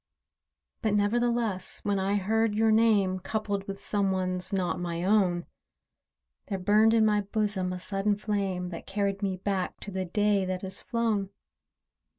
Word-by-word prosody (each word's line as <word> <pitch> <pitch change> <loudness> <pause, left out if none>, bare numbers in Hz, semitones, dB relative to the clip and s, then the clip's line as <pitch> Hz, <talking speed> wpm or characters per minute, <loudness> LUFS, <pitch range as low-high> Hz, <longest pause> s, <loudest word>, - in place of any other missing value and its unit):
But, 215 -3 +1
nevertheless, 225 -1 0
when 200 -1 0
I 195 +2 +1
heard 215 +2 +1
your 220 +1 +3
name, 210 -4 +3
Coupled 200 0 -3
with 195 0 -5
some 200 -1 +1
one's, 185 -1 -2
not 185 -3 -1
my 170 -1 -3
own, 185 -3 +2 1.0
There 195 - -2
burned 215 +4 +4
in 220 -1 +5
my 210 -1 +3
bosom 200 -2 -1
a 185 - -3
sudden 195 +2 0
flame, 195 -4 -2
That 170 - -8
carried 200 0 -1
me 190 -2 -1
back 190 -1 -2
to 205 - -6
the 190 0 -2
day 205 +2 +2
that 185 0 -3
is 190 0 -5
flown. 225 -5 -1
200 Hz, 160 wpm, -28 LUFS, 185-215 Hz, 1.0 s, in